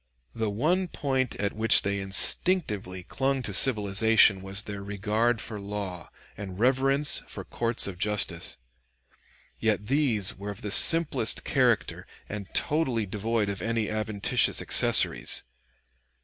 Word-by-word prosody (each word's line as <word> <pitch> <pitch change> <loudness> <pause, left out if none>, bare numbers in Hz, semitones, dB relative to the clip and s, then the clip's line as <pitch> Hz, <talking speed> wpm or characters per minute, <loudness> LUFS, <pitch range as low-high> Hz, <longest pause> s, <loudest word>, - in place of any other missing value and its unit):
] - - -47
The 110 -2 -3
one 165 - 0
point 130 -6 -2
at 100 0 -3
which 110 0 +2
they 100 0 -2
instinctively 95 - +2
clung 135 +5 -2
to 105 - -4
civilization 105 -3 +3
was 95 +2 -6
their 100 -1 -7
regard 105 +4 -1
for 110 -1 -7
law 100 -4 -7 0.3
and 95 -3 -8
reverence 135 +5 +2
for - - -7
courts 115 0 0
of 95 -3 -7
justice. 100 -5 -1 1.0
Yet 105 -2 0
these 125 -7 +2
were 100 +1 -8
of 105 +3 -9
the 105 - -4
simplest 165 +8 +3
character - - 0 0.2
and 100 -2 -8
totally 130 -8 0
devoid 105 +2 -2
of 100 -1 -5
any 115 -1 -2
adventitious 110 -2 0
accessories. - - +3
105 Hz, 135 wpm, -26 LUFS, 100-125 Hz, 1.0 s, civilization